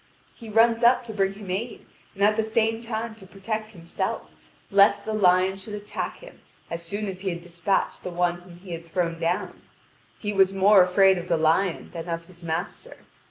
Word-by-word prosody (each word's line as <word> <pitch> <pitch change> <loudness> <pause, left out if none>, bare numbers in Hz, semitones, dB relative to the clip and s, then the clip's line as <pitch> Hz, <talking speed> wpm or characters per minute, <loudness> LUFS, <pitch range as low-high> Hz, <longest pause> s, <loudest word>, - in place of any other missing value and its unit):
He 230 -2 -11
runs 230 +1 +4
up 245 +1 +5
to 225 -2 -8
bring 195 -2 +1
him 195 -2 -8
aid, 225 +6 -4 0.3
and 200 - -1
at 210 +1 +5
the 220 - +1
same 225 +1 0
time 230 -1 -4
to 190 - -14
protect 215 +3 -4
himself, 170 -5 -4 0.4
lest 200 0 +5
the 220 - -2
lion 185 -2 +3
should 210 +2 -7
attack 205 0 -5
him - - -14 0.3
as 170 0 -3
soon 205 +5 -4
as 190 -1 -5
he 190 0 -2
had 170 -1 -4
despatched 175 +3 -1
the - - -5
one 175 0 0
whom 175 -1 -14
he 180 0 -12
had 170 0 -6
thrown 165 -1 -1
down; 170 +2 -2 0.6
he 210 -1 -3
was 195 -1 +4
more 195 +1 +6
afraid 190 +1 +4
of 175 - -8
the 170 - +2
lion 165 +3 +1
than 170 0 -6
of 165 0 -3
his 175 -1 -17
master. 165 +2 -5
195 Hz, 205 wpm, -25 LUFS, 175-215 Hz, 0.6 s, more